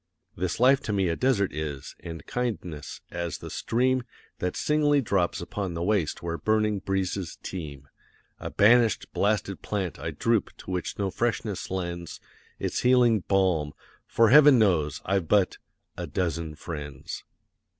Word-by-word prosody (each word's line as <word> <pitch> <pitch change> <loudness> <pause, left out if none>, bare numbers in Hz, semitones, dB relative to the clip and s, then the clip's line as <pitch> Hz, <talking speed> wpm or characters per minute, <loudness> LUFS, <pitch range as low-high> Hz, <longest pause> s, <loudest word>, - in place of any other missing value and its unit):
This 90 +2 -2
life 130 +3 +6
to 105 - -3
me 95 -3 +1
a 85 - 0
desert 110 - +1
is, 75 -3 -5
and 80 -2 -8
kindness, 95 -11 -4
as 85 -2 -3
the - - -9
stream 130 +2 +1 0.4
That 90 0 -2
singly 150 -1 +2
drops 95 -10 0
upon 95 0 -4
the 85 - -2
waste 95 -6 0
where 85 -1 -3
burning 110 -1 +1
breezes 95 -2 -2
teem; 75 -6 -7 0.5
A - - -5
banished, 115 0 +4
blasted 100 -1 0
plant, 95 -5 -3
I - - -3
droop, 115 -3 0
to - - -8
which 90 -1 -3
no 100 -2 -1
freshness 115 -3 -2
lends 85 -3 -4 0.4
Its - - -2
healing 125 -3 +4
balm, 90 -7 +2 0.3
for 115 -1 +4
Heaven 145 -1 +8
knows, 80 -9 +2
I've 95 -4 0
but 100 -1 +2 0.4
a - - -5
dozen 85 -3 -2
friends. 75 -4 -7
95 Hz, 150 wpm, -27 LUFS, 85-110 Hz, 0.5 s, Heaven